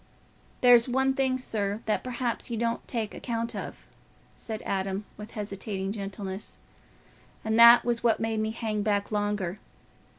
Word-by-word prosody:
"There's 245 -1 +6
one 265 +2 +2
thing, 265 -1 +1
sir, 210 -4 -2
that 215 - 0
perhaps 250 -1 -3
you 235 - -3
don't 230 +1 -2
take 225 -4 -3
account 230 -1 -3
of," - - -7 0.5
said 220 -1 -7
Adam, 195 +1 -2
with 210 +1 -10
hesitating 200 -2 -4
gentleness, 195 -1 -6 0.9
"and 220 +1 +1
that 235 0 +9
was 235 -1 0
what 230 -2 +3
made 225 -1 -1
me 215 0 0
hang 220 -2 -2
back 205 -1 0
longer. 205 -3 -1
220 Hz, 145 wpm, -27 LUFS, 205-235 Hz, 0.9 s, that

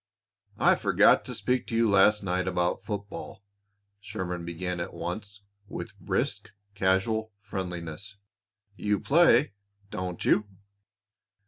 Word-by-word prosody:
"I - - +5
forgot - - +4
to - - -5
speak 125 -1 0
to 115 - -3
you 115 0 +4
last 105 +1 +5
night 90 -1 -1
about 90 0 0
football," 100 -1 -6 0.6
Sherman 90 -4 -5
began 90 +1 -3
at 85 - -5
once 100 +3 -6 0.2
with - - -7
brisk, - - -2 0.2
casual 100 +3 +1
friendliness. 95 -1 -6 0.6
"You 105 -1 0
play, 150 - +4 0.4
don't 90 -1 -4
you?" 105 -1 +3
100 Hz, 115 wpm, -28 LUFS, 90-105 Hz, 0.6 s, I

